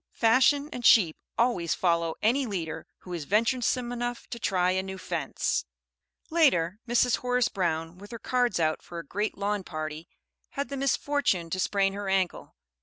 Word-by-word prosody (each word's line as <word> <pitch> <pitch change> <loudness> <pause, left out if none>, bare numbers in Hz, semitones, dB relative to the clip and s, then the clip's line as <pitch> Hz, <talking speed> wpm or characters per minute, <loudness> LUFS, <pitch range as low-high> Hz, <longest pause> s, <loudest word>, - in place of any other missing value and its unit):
Fashion 265 +5 +4
and 245 - -6
sheep 180 -10 +6 0.2
always 225 -9 +1
follow 170 -2 +1
any 250 +5 +2
leader 170 -6 -4
who 180 - -8
is 165 -4 -4
venturesome 240 - +1
enough 240 0 -4
to 235 - -5
try 180 -4 +1
a 190 0 +1
new 190 0 -7
fence. - - -2 0.7
Later, 210 - +3
Mrs. 240 +1 +3
Horace 250 -1 +1
Brown, 165 -2 -2
with 205 +1 -11
her 230 - -6
cards 245 -2 0
out 155 -1 +1
for 170 - -10
a 165 - -6
great 205 +8 -2
lawn 205 0 -1
party, 155 -1 -6 0.5
had 280 - -2
the 280 - -4
misfortune 270 - 0
to 185 - -1
sprain 195 0 +1
her 200 -1 -4
ankle. 190 -2 -1
200 Hz, 170 wpm, -27 LUFS, 175-245 Hz, 0.7 s, sheep